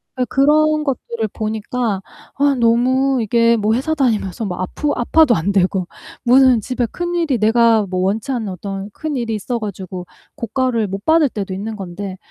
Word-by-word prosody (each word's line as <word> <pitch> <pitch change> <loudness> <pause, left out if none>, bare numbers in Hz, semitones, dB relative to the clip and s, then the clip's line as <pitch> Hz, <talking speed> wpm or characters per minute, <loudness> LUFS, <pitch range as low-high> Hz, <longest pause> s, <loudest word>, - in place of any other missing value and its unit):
어 250 -1 0
그런 305 +3 +3
것들을 235 -5 -3
보니까 220 0 -2 0.4
아 285 0 +2
너무 255 +3 +2
이게 230 +2 +3
뭐 215 +1 +1
회사 275 +6 0
다니면서 225 - 0
막 180 -2 -4
아프 290 +11 -2
아파도 250 +1 +3
안 190 +4 0
되고 185 -1 +1 0.4
무슨 255 -1 +5
집에 250 +3 -2
큰일이 345 -4 -1
내가 225 0 +4
뭐 185 0 -1
원치 205 +7 -1
않는 235 -5 -2
어떤 195 +2 -6
큰일이 255 -5 -3
있어가지고 200 -5 -5 0.3
고과를 240 -2 -1
못 195 +1 -6
받을 315 -2 +4
때도 200 -4 -5
있는 215 +3 -5
건데 190 0 -7
230 Hz, 320 characters per minute, -18 LUFS, 200-265 Hz, 0.4 s, 무슨